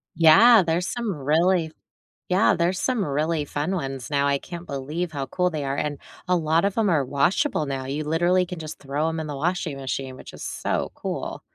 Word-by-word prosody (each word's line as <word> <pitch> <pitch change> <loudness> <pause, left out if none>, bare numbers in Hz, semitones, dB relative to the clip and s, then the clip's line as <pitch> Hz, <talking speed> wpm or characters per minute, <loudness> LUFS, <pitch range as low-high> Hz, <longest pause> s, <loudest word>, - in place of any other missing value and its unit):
Yeah, 195 +8 +7
there's 170 +2 0
some 235 -4 -2
really 160 +4 +2 0.6
Yeah, 185 +4 +4
there's 175 +2 0
some 250 -5 0
really 150 0 -1
fun 150 +7 -2
ones 135 -4 -4
now, 140 -1 +2
I 140 0 +2
can't 175 +4 -9
believe 155 +5 -4
how 140 -2 -3
cool 180 +5 0
they 155 -4 -4
are, 135 0 -1
and 145 -1 -2 0.3
a 180 - +3
lot 165 +2 +2
of 200 - -2
'em 215 -4 +2
are 155 -4 +3
washable 170 - +1
now; 135 -2 -4
you 145 +3 -3
literally 175 +4 +2
can 180 -1 -7
just 155 -1 -7
throw 145 +3 -2
'em 165 0 -3
in 160 - -3
the 145 - -4
washing 160 -2 -2
machine, 135 -1 -4
which - - -12
is - - -10
so - - -2
cool. - - -5
160 Hz, 210 wpm, -24 LUFS, 140-180 Hz, 0.6 s, Yeah